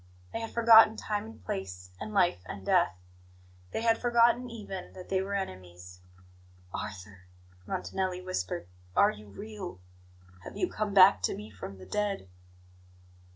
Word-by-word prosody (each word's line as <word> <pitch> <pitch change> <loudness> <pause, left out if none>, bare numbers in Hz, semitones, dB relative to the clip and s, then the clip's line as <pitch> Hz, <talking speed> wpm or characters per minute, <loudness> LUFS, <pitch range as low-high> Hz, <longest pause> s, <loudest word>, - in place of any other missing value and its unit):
They - - -2
had 225 0 -4
forgotten 225 -1 +7
time 210 - -3
and 110 -4 -13
place, 90 -1 -5
and 215 - -6
life 185 - +3
and 95 -1 -7
death; 85 - +3 0.7
they 225 - -3
had 225 -1 +3
forgotten, 240 +1 +4
even, 200 -5 -7
that 185 -1 -11
they 190 -1 +1
were 200 +1 -3
enemies. 90 - -6 0.7
"Arthur," 95 -1 -7 0.4
Montanelli 180 - -2
whispered, 90 - -3 0.3
"are - - +6
you 105 0 -12
real? 195 - -8 0.6
Have - - -9
you 365 - +1
come 210 -2 -2
back 190 +1 +8
to - - 0
me 105 +1 -9
from 100 -1 -8
the 95 - -11
dead?" 205 - -2
185 Hz, 150 wpm, -30 LUFS, -, 0.7 s, back